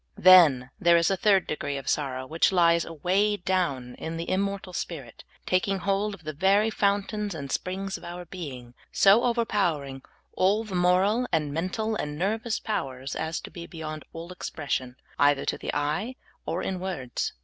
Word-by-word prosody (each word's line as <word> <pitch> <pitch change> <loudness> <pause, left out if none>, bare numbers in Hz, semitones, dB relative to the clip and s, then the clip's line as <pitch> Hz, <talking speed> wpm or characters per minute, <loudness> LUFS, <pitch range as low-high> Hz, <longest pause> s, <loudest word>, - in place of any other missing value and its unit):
Then 155 -9 +7
there 170 0 +5
is 170 +2 +2
a - - +2
third 195 -1 +3
degree 145 -2 -3
of 135 -1 -8
sorrow 130 -3 -1
which 160 +7 +2
lies 170 -2 +4
away 190 +6 +1
down 170 -10 -1
in 165 0 -4
the 165 - -4
immortal 195 -1 -2
spirit, 140 -10 -6 0.2
taking 190 +2 +1
hold 200 +3 -1
of 170 - -20
the 155 0 -5
ver}^ 200 +7 +3
fountains 200 0 0
and 140 -3 -6
springs 190 +1 -3
of - - -18
our 175 +1 -7
being, 135 -9 -8 0.2
so 200 +4 +5
overpower 210 - +1
ing 135 -1 -8 0.3
all 200 +4 +2
the 215 -3 -9
moral 185 +7 +3
and 150 -4 0
mental 200 +7 -2
and 150 -6 -4
nervous 220 - -1
powers 135 -10 -4
as 160 +1 -2
to - - -10
be 170 -1 -8
beyond 155 -2 -7
all 165 +2 -8
expression, 140 -7 -4 0.2
either 145 -1 +3
to - - 0
the - - -6
^ye 155 - -2 0.3
or 165 +3 -2
in 185 -1 -2
words. 175 -10 -3
175 Hz, 175 wpm, -27 LUFS, 150-195 Hz, 0.3 s, Then